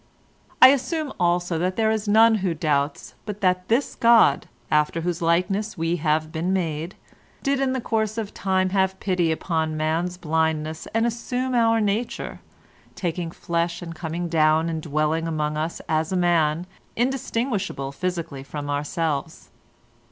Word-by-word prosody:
"I 255 - +12
assume 280 +3 0
also 175 -1 +1
that 185 +2 0
there 220 -1 +2
is 215 -1 -2
none 225 +2 +6
who 180 -3 0
doubts 145 -2 -1
but 210 0 -6
that 180 -1 +1
this 240 +5 +1
God, 230 -11 +4 0.2
after 150 +2 +2
whose 175 +1 -2
likeness 185 +6 0
we 165 +1 0
have 155 0 0
been 165 +4 -1
made, 165 -2 -2 0.5
did 275 0 +1
in 270 -1 +1
the 260 - -1
course 220 -1 -1
of 215 -3 -4
time 190 -1 0
have 190 -1 +1
pity 180 -4 +1
upon 160 -1 -1
man's 165 +3 -1
blindness, 160 -2 -1
and 225 +1 +3
assume 245 +2 -2
our 230 -2 +3
nature, 210 +3 -2 0.6
taking 175 -1 -3
flesh 170 +1 -2
and 165 -1 -7
coming 165 +1 -4
down 160 0 +3
and 160 -1 -3
dwelling 155 +2 0
among 150 -2 -1
us 155 +2 -3
as 160 +1 0
a 185 - +1
man 170 -2 +2 0.3
indistinguishable 230 - -1
physically 170 -3 -4
from 145 +1 -5
ourselves. 150 +1 -3
175 Hz, 150 wpm, -24 LUFS, 160-210 Hz, 0.6 s, I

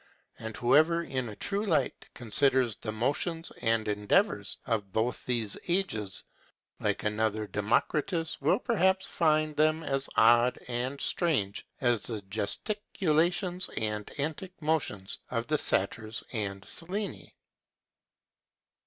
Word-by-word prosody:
And 110 -1 -6
whoever, 155 +7 +4
in 130 -6 -3
a 105 - -8
true 200 - -1
light, 175 -8 0
considers 125 0 +2
the 110 +3 -5
motions 150 +9 -1
and 115 -1 +1
endeavors 105 - +1
of 105 -5 -1
both 110 +5 -1
these 115 -5 0
ages, 170 - 0 0.6
like - - -1
another 110 0 0
Democritus, 150 - 0
will 140 - +3
perhaps 190 -6 +2
find 155 -2 +1
them 155 +2 +2
as 135 -2 -1
odd 120 +2 +5
and 125 +3 -2
strange 120 - 0
as 120 -4 +2
the 110 -2 -4
gesticulations 175 - 0
and 105 -1 -2
antic 160 +6 -4
motions 150 - -1
of 115 -1 -2
the 155 +3 +1
Satyrs 110 +3 0
and 100 -3 -3
Sileni. 185 - -4
125 Hz, 120 wpm, -29 LUFS, 110-165 Hz, 0.6 s, odd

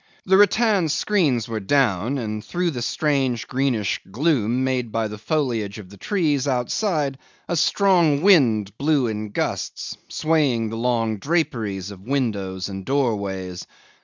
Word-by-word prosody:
The 190 - +4
rattan 205 -3 +3
screens 150 - +1
were 115 -2 -3
down, 120 +1 +1
and 110 -3 -4
through 175 -1 -1
the 125 -5 -5
strange 135 -3 0
greenish 125 -6 0
gloom 125 0 +1
made 130 -3 -1
by 115 0 0
the 105 0 -8
foliage 115 -7 -1
of 100 -3 -11
the 100 - -13
trees 150 - 0
outside 140 - -1 0.3
a 175 - -1
strong 170 -3 +3
wind 115 - +4
blew 145 -2 +2
in 110 -2 -3
gusts, - - -3
swaying 140 -8 +1
the - - -4
long 115 -2 0
draperies 110 - -1
of 95 -2 -11
windows 100 -7 -2
and 95 -1 -6
doorways. 100 -8 -2
125 Hz, 140 wpm, -22 LUFS, 105-150 Hz, 0.3 s, The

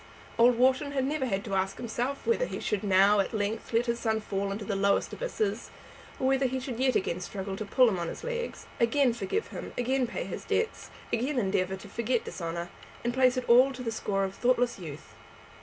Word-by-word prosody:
Old 240 0 +6
Wharton 260 +3 +3
had 265 -2 +1
never 285 -1 -1
had 195 -3 -2
to 200 - -5
ask 190 0 0
himself 245 +4 -3
whether 470 +2 +2
he - - -5
should 210 -1 -1
now, 200 +1 +5
at 200 - 0
length, 210 +1 -2
let 230 +1 +2
his 235 -1 -1
son 220 -2 0
fall 200 -2 -2
into 205 +1 -4
the 205 - -2
lowest 200 0 +1
abysses, 485 -4 -2 0.5
or - - -1
whether 265 0 +3
he 260 +1 -2
should 250 -2 -5
yet 260 -1 +2
again 180 -1 0
struggle 190 +1 -5
to 215 - -5
put 250 +5 +5
him 195 -6 0
on 170 - -2
his - - -7
legs, 480 0 -4
again 240 +2 +3
forgive 230 - -2
him, - - -7
again 255 +1 +1
pay 235 - -4
his - - -6
debts, 455 0 -1 0.2
again 255 +5 0
endeavour 190 -4 +1
to 190 - -11
forget 235 +1 -1
dishonour, 170 0 -5 0.3
and 240 0 0
place 255 0 +4
it 255 - -2
all 255 +3 +7
to 250 -1 -7
the 230 - -2
score 200 -3 -1
of 190 0 -2
thoughtless 245 0 +1
youth. 155 -4 -9
235 Hz, 220 wpm, -29 LUFS, 195-260 Hz, 0.5 s, all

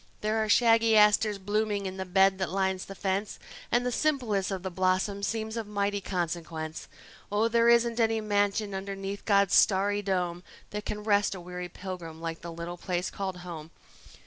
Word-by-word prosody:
There 220 +1 +1
are 215 - -3
shaggy 225 0 +5
asters 210 0 +4
blooming 205 +1 -1
in 190 0 -5
the 190 - -3
bed 190 +1 +3
that 190 -4 -1
lines 190 0 -1
the 195 - -9
fence, 195 +2 -2 0.3
And 240 +1 +2
the 250 - 0
simplest 240 -9 0
of 190 -2 -4
the 190 - -4
blossoms 190 +2 0
seems 220 0 -3
of 225 -2 -4
mighty 205 -1 -1
consequence. 165 -3 -4 0.4
Oh, 210 +2 +2
there 235 0 +3
isn't 235 0 +3
any 225 -1 +2
mansion 205 0 0
underneath 195 +1 -5
God's 200 -2 +3
starry 205 +1 +4
dome 180 -3 -1 0.3
That 210 0 -5
can 210 0 -4
rest 205 -2 +2
a - - -7
weary 180 0 -6
pilgrim 175 -3 -7
like 165 0 -5
the 170 - -7
little 170 +1 -6
place 180 0 -2
called 190 -2 -4
home. 160 -3 -7
200 Hz, 180 wpm, -28 LUFS, 185-215 Hz, 0.4 s, shaggy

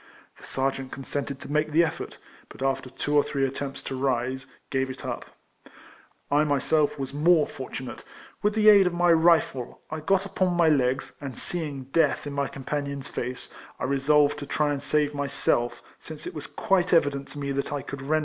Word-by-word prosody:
The - - -12
sergeant 135 0 -1
consented 140 0 -4
to - - -8
make 150 +1 +1
the 165 +3 +5
effort, 165 - -4 0.3
but - - -8
after 135 -1 -1
two 145 +3 -2
or 145 - +7
three 140 -1 -1
attempts 135 0 -4
to 135 - -4
rise, 130 0 -1 0.2
gave 135 -1 0
it 130 - -8
up. - - -4 1.0
1 150 +2 +3
myself 145 +2 +2
was 135 -1 -4
more 155 +1 +4
fortunate: 130 -1 -7 0.4
with 210 +1 +1
the 215 -1 +3
aid 200 -3 +8
of 175 - -1
my 175 0 +5
rifle 160 -6 +2
I 155 - -3
got 195 +5 +1
upon 185 -2 0
my 170 -2 +5
legs, 135 -2 +1
and 135 -4 -6
seeing 150 -6 -3
death 145 +3 +1
in 145 - -5
my 140 -1 0
com 135 - -9
panion's 140 -1 -3
face, 125 +1 -5 0.2
I - - -7
resolved 145 +2 +3
to 145 - -7
try 150 0 +1
and 140 - -4
save 150 0 +1
myself, 140 -4 0 0.2
since 155 -1 -9
it - - -5
was 150 - -7
quite 185 -2 +1
evident 145 -4 +2
to - - -10
me 140 -1 -2
that 140 0 -2
I 145 -2 -3
could 140 - -7
render - - -8
him - - -7
no 155 - +4
assistance. - - +3
145 Hz, 205 wpm, -26 LUFS, 135-155 Hz, 1.0 s, aid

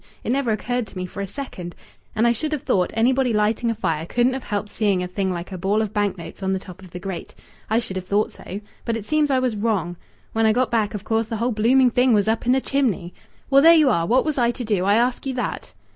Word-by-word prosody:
It - - -1
never 270 -2 0
occurred 240 +2 -1
to 195 - -12
me 185 - -3
for 185 +2 -7
a 200 - -3
second.... 185 - -7 0.4
And 220 - +2
I 235 - +5
should 305 +7 -3
have 295 - -3
thought 180 -2 +1
anybody 250 +2 +2
lighting 215 +3 +1
a 230 - 0
fire 160 -4 -2
couldn't 245 +5 +2
have 265 - -5
helped 205 0 -3
seeing 200 -4 +1
a - - -3
thing 190 +1 -2
like 175 +1 -5
a 185 - -6
ball 195 +4 +1
of 215 -2 -2
bank 205 -2 0
notes 170 +3 -10
on 190 0 0
the - - 0
top 185 0 -11
of 185 - -12
the 180 - -8
grate. 190 0 -6 0.3
I 220 - +2
should 225 -5 -2
have 185 -1 -6
thought 205 +2 +1
so. 200 +3 -8 0.2
But 230 -1 -1
it 215 - -7
seems 305 +1 +1
I 270 - +3
was 255 -3 0
wrong. 200 -5 -1 0.4
When 225 0 +3
I 220 - +4
got 250 +1 +1
back 220 -2 0
of 205 - -5
course 225 0 0
the 225 -1 -3
whole 240 +3 0
blooming 245 +4 +4
thing 250 +1 +3
was 205 -1 +3
up 220 +1 +1
the 255 +2 +3
chimney. 215 -12 -1 0.4
Well, 275 0 +7
there 330 +3 +8
you 300 -5 +5
are! 170 0 +1
What 255 +6 +3
was 305 -3 -1
I 235 -1 +3
to 245 +1 -3
do? 205 -4 0
I 200 +1 +4
ask 245 +2 +1
you 265 - -2
that." 245 - -4
220 Hz, 275 wpm, -22 LUFS, 195-250 Hz, 0.4 s, there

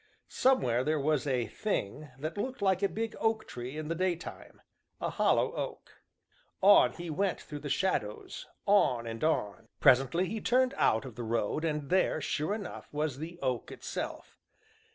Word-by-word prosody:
Somewhere 125 - +2
there 155 +2 +1
was 150 -1 +1
a 125 -3 +1
"thing" 150 - -3
that 155 +4 -4
looked 255 +5 -3
like 190 -1 +3
a 200 - +2
big 225 0 -3
oak 225 -1 +1
tree 125 +4 -6
in 155 -1 -4
the 165 - 0
daytime 175 -1 -3 0.4
a - - -2
hollow - - +2
oak. - - -6 0.6
On 200 +1 +7
he 170 -2 -6
went 190 +3 0
through 150 - -8
the 145 - -6
shadows, 120 - -2 0.2
on 130 -13 +3
and 115 0 -5
on. 105 - 0
Presently 135 +6 +4
he 220 +2 -4
turned 255 +2 +3
out 110 - +2
of 130 - -8
the 120 +2 -6
road, 115 +6 -1
and 150 -3 -2
there, 185 -3 +3
sure 155 +6 -1
enough, 205 -5 -8
was 150 -2 -2
the 170 +3 -6
oak 125 -3 -1
itself. - - -6
155 Hz, 170 wpm, -31 LUFS, 130-190 Hz, 0.6 s, On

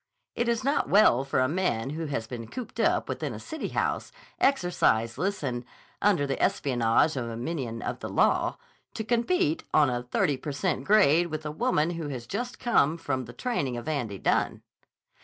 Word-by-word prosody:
It 240 - -1
is 235 -1 0
not 280 +3 +1
well 160 - +5
for 135 - 0
a 130 - +3
man 140 -7 -1
who 160 +1 -4
has 135 -6 -2
been 115 -1 -7
cooped 250 - -7
up - - +2
within - - -3
a - - -7
city 315 -1 -5
house, - - -1 0.3
exerciseless 180 - +1
and 125 -3 -2 0.4
under 190 -8 +3
the 135 -1 -2
espionage 125 +3 +2
of 120 -3 -3
a 115 - -5
minion 120 -4 -4
of - - -3
the - - -5
law, - - +2 0.4
to 220 - -3
compete 310 - +1
on 145 -4 +5
a 120 0 -1
thirty 125 +3 0
per 145 +2 -5
cent 180 +6 -1
grade 175 -5 +5
with 155 -1 -5
a 150 - -2
woman 170 -4 +1
who 165 -3 -4
has 125 -4 -5
just 245 - -4
come 170 - +2
from 130 -6 -2
the 120 - -10
training 140 - -2
of 120 - -7
Andy 125 -10 -2
Dunne. - - 0
150 Hz, 190 wpm, -27 LUFS, 125-205 Hz, 0.4 s, well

